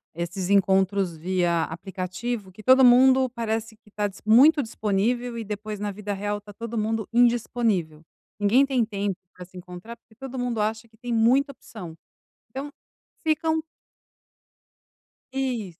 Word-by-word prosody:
esses 175 +2 -4
encontros 190 -2 +2
via 170 0 0
aplicativo, 190 +5 -5
que 215 +3 -14
todo 260 +2 +6
mundo 260 +1 +6
parece 225 -2 -3
que 210 -2 -24
tá 210 0 -1
dis 195 - -12
muito 275 +7 +6
disponível 230 +3 -1
e 225 - -4
depois, 210 0 -5
na 205 0 -2
vida 205 +1 -5
real, 205 +1 -2
está 205 0 -14
todo 230 +2 -6
mundo 220 0 -1
indisponível. 230 -9 +1 0.4
Ninguém 235 +7 +4
tem 260 -4 +1
tempo 200 -3 -3 0.2
para 180 -1 -10
se 185 0 -15
encontrar, 180 +6 -9
porque 220 -1 -27
todo 265 +1 -7
mundo 240 -3 -1
acha 220 +2 -2
que 220 0 -26
tem 240 0 -4
muita 255 +5 +3
opção. 180 -10 -10 0.6
Então, 275 +4 -6 0.6
ficam 315 0 +1 1.7
Isso. 240 -10 -3
215 Hz, 150 wpm, -25 LUFS, 195-245 Hz, 1.7 s, todo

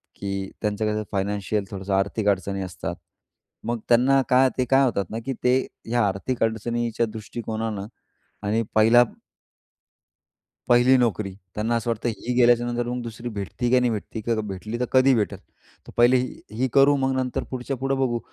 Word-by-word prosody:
की 100 -1 -4
त्यांच्या 105 0 -1
कशा 105 0 -1
फायनान्शियल 100 +1 -1
थोडंसं 95 0 -4
आर्थिक 100 +2 0
अडचणी 95 0 -1
असतात. 90 -2 -5 0.7
मग 120 -1 -1
त्यांना 130 +3 +5
काय 130 +1 +5
ते 130 - +1
काय 135 +1 +6
होतात 100 -6 0
ना, 115 - -3
की 135 - -1
ते 125 +1 +5 0.3
ह्या 120 0 +2
आर्थिक 105 +6 -2
अडचणीच्या 115 +1 -1
दृष्टिकोनानं 110 -2 -4 0.6
आणि 110 +3 +1
पहिला 115 +3 +6 1.7
पहिली 120 +2 +6
नोकरी. 110 -4 0 0.2
त्यांना 115 +3 0
असं 115 +1 -1
वाटतं, 115 +1 -1
ही 120 +2 -3
गेल्याच्यानंतर 120 0 +3
मग 125 0 -3
दुसरी 115 +1 -6
भेटती 110 +3 -3
की 130 - +5
नाही 125 - +2
भेटती, 110 +1 -4
की 115 +2 0
भेटली 105 +5 -5
तर - - +2
कधी 130 +1 +5
भेटेल. 105 -4 -1 0.5
तर - - -11
पहिले 120 +2 +6 0.4
ही 130 +2 +1
करू, 140 +1 +5
मग 135 -1 0
नंतर 130 -1 -2
पुढच्या 130 +1 -3
पुढं 135 +1 -1
बघू. 120 -3 +1
115 Hz, 165 wpm, -24 LUFS, 105-125 Hz, 1.7 s, काय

